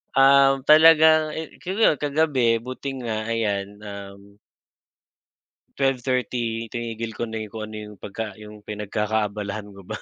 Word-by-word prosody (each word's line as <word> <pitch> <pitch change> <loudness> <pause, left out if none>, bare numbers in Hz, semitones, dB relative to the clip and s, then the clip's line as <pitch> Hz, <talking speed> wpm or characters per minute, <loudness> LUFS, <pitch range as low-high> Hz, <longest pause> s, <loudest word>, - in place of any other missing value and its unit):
Um, 135 0 +5
talagang 155 0 +6
eh 160 0 -6
tignan 185 +1 -5
mo 225 - -2
iyon 150 - -4
kagabi 140 -6 +2
buti 130 0 -6
nga 110 -1 -3
ayan 105 -4 -1 0.2
um. 100 0 -10 1.4
12:30, 125 -3 -1
tinigil 115 -1 -4
ko - - -6
na 110 -1 -3
yung 110 0 -8
kung 110 -1 -4
ano 110 - -8
yung 105 0 -9
pagka 105 0 -5
yung 105 0 -13
pinagkakaabalahan 105 0 -3
ko 100 -2 -14
ba. - - -5
115 Hz, 145 wpm, -23 LUFS, 105-135 Hz, 1.4 s, talagang